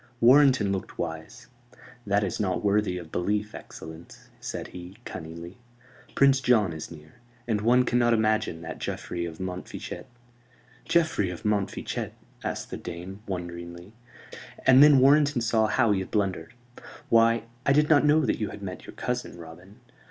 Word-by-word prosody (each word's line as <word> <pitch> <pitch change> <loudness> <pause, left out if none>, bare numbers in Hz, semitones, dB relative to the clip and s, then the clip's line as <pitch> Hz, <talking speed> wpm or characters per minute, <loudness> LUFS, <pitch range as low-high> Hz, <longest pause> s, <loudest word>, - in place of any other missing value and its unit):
Warrenton 125 -4 +5
looked 95 -2 -4
wise. 85 +9 -6 0.6
"That 100 +1 +2
is 100 - -3
not 95 -2 -1
worthy 100 -2 +1
of 85 -3 -9
belief, 105 +4 -1
excellence," 80 +1 -11
said - - -6
he, 90 +3 -10
cunningly. 85 +5 -8 0.6
"Prince 140 -1 +4
John 110 -9 +3
is 80 - -7
near; 75 -2 -14 0.3
and 110 -3 0
one 125 +3 +4
cannot 120 -1 +2
imagine 110 -7 +1
that 80 - -7
Geoffrey 85 -1 -4
of 80 -1 -9
Montfichet 95 +6 -6 0.4
" 120 0 -30
"Geoffrey 160 - +2
of 90 - -7
Montfichet?" 105 -2 -2 0.3
asked - - -4
the - - -4
dame, 95 +4 -8
wonderingly: 85 0 -7 0.7
and 130 +1 +7
then 145 -1 +8
Warrenton 140 +1 +4
saw 110 -1 +2
how 115 0 +2
he 100 - +2
had 95 - -5
blundered. 105 +3 -2 0.5
"Why, 115 0 +4 0.2
I - - +2
did 150 +2 +4
not 150 -2 +5
know 150 +1 +4
that - - 0
you 105 - -2
had 100 - -9
met 90 -1 -7
your - - -11
cousin, 125 -7 -4
Robin. 90 +7 -13
105 Hz, 160 wpm, -26 LUFS, 90-120 Hz, 0.7 s, then